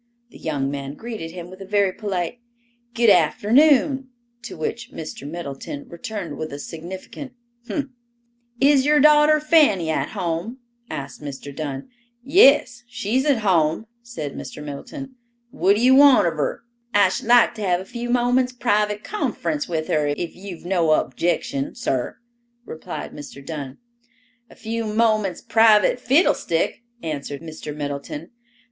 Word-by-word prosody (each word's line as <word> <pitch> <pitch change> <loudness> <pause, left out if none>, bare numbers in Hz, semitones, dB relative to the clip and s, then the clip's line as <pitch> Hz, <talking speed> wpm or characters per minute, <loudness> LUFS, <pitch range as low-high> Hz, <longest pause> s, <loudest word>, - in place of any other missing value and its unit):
The - - -14
young 140 -4 -2
man 140 0 -5
greeted 220 -7 -6
him 175 +1 -9
with 185 +1 -12
a - - -5
very 200 -1 +2
polite, 195 +1 -3 0.6
"Good 235 -2 +5
afternoon," 260 - +3 0.3
to - - -8
which 230 +10 -4
Mr. 150 -2 -7
Middleton 170 - -7
returned 185 +2 -6
with 155 - -4
a 140 - -6
significant 185 - -8 0.4
"umph!" 290 - -2 0.7
"Is 275 0 +5
your 300 +1 +4
daughter 300 +1 +6
Fanny 295 - +3
at - - -1
home?" 180 +6 -3 0.3
asked 140 +1 -6
Mr. 140 -1 -8
Dunn. 140 - -5 0.3
"Yes, 275 - +5
she's 245 +2 -1
at 270 -6 +2
home," 170 -1 +2 0.2
said 195 - -6
Mr. 150 - -8
Middleton. 260 - -8 0.3
"What 200 -2 +3
d'ye 245 +4 +4
want 275 -3 +7
of 170 - +1
her?" 150 +6 -3 0.3
"I 200 -2 +6
should 190 - -4
like 240 -1 +6
to 220 - -9
have 180 -3 +1
a 190 - -8
few 240 +2 -6
moments' 250 +1 +2
private 210 -3 0
conference 305 -8 -2
with 160 -2 -2
her, 150 -1 +1
if 170 - -5
you've 185 -3 -9
no 175 -4 +2
objection, 140 -1 -1
sir," 130 -2 -2 0.5
replied 160 - -7
Mr. 140 -2 -10
Dunn. 140 -3 -6 0.7
"A - - -16
few 225 0 -4
moments 215 -4 +1
private 225 0 +4
fiddlestick," 250 - +1 0.2
answered 145 -1 -5
Mr. 155 -2 -7
Middleton. 145 +2 -5
200 Hz, 145 wpm, -22 LUFS, 155-245 Hz, 0.7 s, want